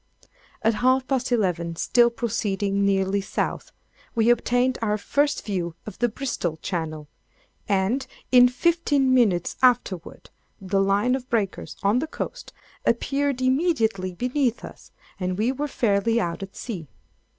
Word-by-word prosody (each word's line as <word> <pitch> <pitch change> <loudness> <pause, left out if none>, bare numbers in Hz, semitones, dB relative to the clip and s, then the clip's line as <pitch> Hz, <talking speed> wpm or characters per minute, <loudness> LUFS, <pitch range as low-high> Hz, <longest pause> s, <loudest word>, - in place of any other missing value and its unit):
At 225 +1 +3
half 255 +4 +2
past 260 -2 -1
eleven 175 -7 0
still 240 +7 +4
proceeding 205 -4 -1
nearly 195 0 +1
South, 195 - -3 0.4
we 230 +1 +4
obtained 245 +2 +1
our 210 -2 +1
first 285 +8 0
view 175 -5 -3
of 215 - -9
the 240 - +2
Bristol 215 - -3
Channel; 155 -4 -4 0.6
and, 200 +7 +1 0.2
in 250 -1 +8
fifteen 280 -1 +2
minutes 205 -9 +2
afterward, 220 -9 +1 0.3
the 195 0 0
line 200 +5 +2
of 255 -1 -3
breakers 210 -5 -2
on 205 +5 +3
the 315 - -2
coast - - -6 0.3
appeared 275 -2 0
immediately 255 - +1
beneath 250 +5 -1
us, - - -13 0.3
and 185 -1 -2
we 225 +5 +1
were 290 +3 -3
fairly 225 -2 +1
out 175 -1 -2
at 195 0 -8
sea. 185 -10 -6
225 Hz, 140 wpm, -24 LUFS, 195-255 Hz, 0.6 s, in